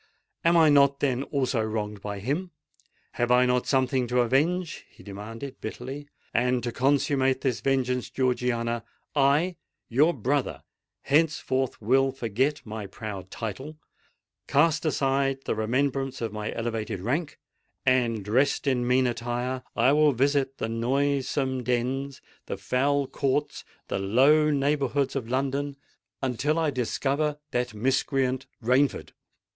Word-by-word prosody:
Am 170 +1 +4
I 160 -2 +6
not, 140 -1 +5
then, 130 -3 +1
also 135 -4 -1
wronged 105 -2 -3
by 100 0 -5
him? 145 - -2 0.6
Have 120 0 -1
I 125 +1 +5
not 125 0 +1
something 130 -2 +1
to 125 +1 +2
avenge?" 165 +8 0
he - - -18
demanded 115 +7 -8
bitterly. 135 +6 -6 0.3
"And 125 +1 +1
to 120 - -2
consummate 135 0 +1
this 125 -6 -1
vengeance, 125 -1 0
Georgiana, 120 -3 0 0.3
I—your 150 0 +1
brother 135 +3 -1 0.4
henceforth—will 135 -4 +1
forget 130 +4 -1
my 110 -2 -6
proud 100 -2 -7
title—cast 145 - -3
aside 135 -2 +1
the - - 0
remembrance 135 +4 -1
of 115 -3 -3
my 105 0 -3
elevated 115 -4 -3
rank;—and, 125 - -2
dressed 130 +10 +1
in 125 -3 +1
mean 130 +1 +3
attire, 120 +2 -2
I 120 +3 +4
will 150 0 +4
visit 135 +1 +1
the - - -2
noisome 130 +2 0
dens—the 125 -1 -3
foul 135 +8 +1
courts—the 140 -6 -3
low 135 +10 +4
neighbourhoods 140 -1 0
of 120 -4 -3
London, 140 +2 -1 0.5
until 135 +5 0
I 160 -2 +1
discover 140 +4 -1
that 125 -2 -1
miscreant 130 +2 0 0.2
Rainford. 130 +4 +2
130 Hz, 120 wpm, -26 LUFS, 120-140 Hz, 0.6 s, I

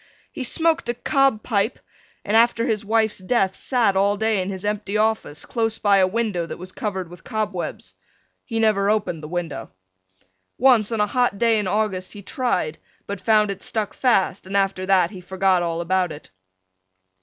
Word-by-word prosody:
He 265 - -5
smoked 320 0 +1
a 240 - 0
cob 270 -2 +1
pipe 215 0 0 0.5
and 210 - 0
after 230 0 +4
his 220 -4 -1
wife's 220 0 +1
death 190 -1 +1
sat 235 -7 +1
all 200 +1 +2
day 220 -2 +1
in 185 - -3
his 190 0 -5
empty 210 0 -1
office 215 -8 -1
close 225 -2 -1
by 200 -1 +3
a 190 -1 +4
window 200 -5 -1
that - - -7
was 185 +1 -8
covered 190 -4 -4
with 175 0 -14
cobwebs. 210 -5 -4 0.5
He 225 -3 -3
never 210 -3 +2
opened 205 -7 0
the 150 - -7
window. 170 -8 -4 0.9
Once 240 -4 +4
on 225 -2 0
a - - +4
hot 245 0 0
day 230 0 +3
in 205 - -2
August 195 -2 -1
he 205 - -10
tried 180 - -1 0.3
but 200 - -6
found 215 -2 +3
it 195 -1 -7
stuck 215 -2 -2
fast 195 -7 +1
and 195 +1 -1
after 195 -1 0
that 185 -2 +3
he 190 -3 -9
forgot 190 0 +1
all 170 -1 -2
about 180 0 0
it. 150 -9 -11
205 Hz, 185 wpm, -22 LUFS, 185-225 Hz, 0.9 s, after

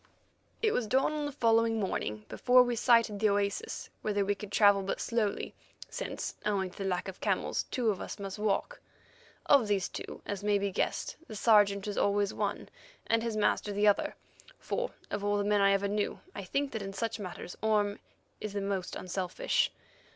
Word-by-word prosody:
It 435 - +4
was 240 - 0
dawn 265 +6 +2
on 300 -1 -2
the - - -4
following 230 -3 +3
morning 110 - -2
before 250 0 +5
we 245 -1 -1
sighted 230 -3 +3
the 215 0 +4
oasis, 200 0 -1
whither 205 -2 0
we 205 - +2
could 205 0 -9
travel 205 -2 +5
but 195 - -3
slowly, 225 -4 -1 0.4
since, - - -4
owing 195 -3 0
to - - -17
the 195 -1 -1
lack 180 0 -1
of 190 - -8
camels, - - 0
two 240 -5 +1
of 195 - -5
us - - -6
must 200 0 -6
walk. 215 - -1 0.6
Of 275 -6 +5
these 200 -3 +1
two, - - -8
as 205 0 -4
may 205 -1 +3
be 200 0 -1
guessed, - - -2
the 215 - -8
Sergeant 205 -2 +4
was 205 -1 -2
always 200 0 +2
one - - -3 0.4
and 230 0 +2
his 230 -2 -2
master 210 0 +1
the 205 +1 +1
other, 205 - +2 0.4
for - - -2 0.2
of 205 0 -2
all 205 0 +1
the 205 - +1
men 205 0 +2
I 200 0 +5
ever 200 0 +2
knew 205 +1 -1
I 200 - -6
think 275 +8 -1
that 220 - -4
in 195 0 -5
such 230 +2 -3
matters 180 -2 -7
Orme 210 -1 +1 0.4
is 215 -1 -5
the 200 - -2
most 195 -2 -2
unselfish. 185 0 0
205 Hz, 195 wpm, -31 LUFS, 200-225 Hz, 0.6 s, before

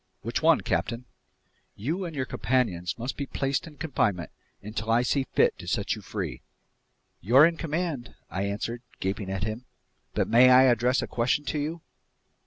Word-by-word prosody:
"Which - - -2
one, - - +5
captain?" 120 +2 -2 0.7
"You 160 - -2
and 165 -3 -6
your 130 -2 -1
companions 115 -11 -1
must 120 +3 -4
be 140 - -3
placed 135 +5 -1
in 150 -2 -13
confinement 110 - -1 0.3
until 110 +2 -5
I 115 +2 +4
see 135 +1 0
fit - - +4
to - - -9
set - - 0
you - - -7
free." - - -5 0.8
"You're 125 - +6
in 170 0 +2
command," 160 -5 -3
I 95 +2 -3
answered, 110 +4 -3 0.2
gaping 95 +1 -2
at 95 0 -3
him. 110 +4 -4 0.5
"But - - +1
may 125 +2 +7
I 130 +1 +8
address 125 0 +3
a - - -4
question 125 +5 0
to 150 - -1
you?" 160 +3 -3
125 Hz, 175 wpm, -27 LUFS, 110-145 Hz, 0.8 s, I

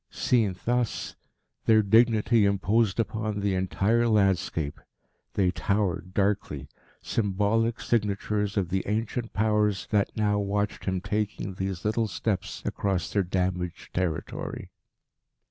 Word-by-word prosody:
Seen 110 -7 +1
thus, 120 -1 -1 0.5
their 110 -1 +6
dignity 110 +1 +4
imposed 100 +2 +2
upon 110 -2 -1
the 100 -1 +1
entire 100 +5 +1
landscape. 95 -8 +1 0.5
They 95 -2 +3
towered 95 -3 -1
darkly, 95 -9 0 0.3
symbolic 110 +2 +1
signatures 105 -1 0
of 95 -4 +1
the 95 +1 0
ancient 115 +2 -2
Powers 105 -2 +1
that 105 0 +1
now 105 -1 +2
watched 100 +1 -1
him 95 -1 -1
taking 105 -1 -2
these 95 0 -4
little 110 +1 +1
steps 95 +2 -3
across 95 -6 -1
their 100 - +3
damaged 90 -1 -2
territory. 90 -4 -3
100 Hz, 115 wpm, -27 LUFS, 95-110 Hz, 0.5 s, their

